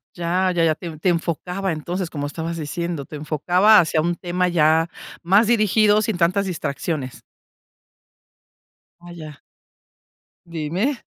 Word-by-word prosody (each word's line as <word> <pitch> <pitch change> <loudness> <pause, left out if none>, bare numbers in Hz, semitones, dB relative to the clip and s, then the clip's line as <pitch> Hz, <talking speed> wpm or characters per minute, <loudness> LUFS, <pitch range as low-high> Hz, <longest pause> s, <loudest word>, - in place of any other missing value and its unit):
Ya, 180 +2 0
ya, 170 -2 +1
ya, 160 -2 +3
te 175 - -11
en 155 -2 -7
te 180 - +1
enfocaba. 180 +3 -2
Entonces, 170 +3 -4
como 145 -2 -4
estabas 165 +2 -5
diciendo, 165 -1 -4
te 150 - -10
enfocaba 175 +8 +3
hacia 160 -1 +1
un 170 +2 0
tema 180 +1 -1
ya 160 -1 +3 0.4
más 200 +5 +4
dirigido, 215 -2 +3
sin 210 -4 -2
tantas 185 +4 +1
distracciones. 150 -5 -4 1.8
Vaya. 165 -4 -10 1.1
Dime. 170 - -3
170 Hz, 130 wpm, -21 LUFS, 155-185 Hz, 1.8 s, más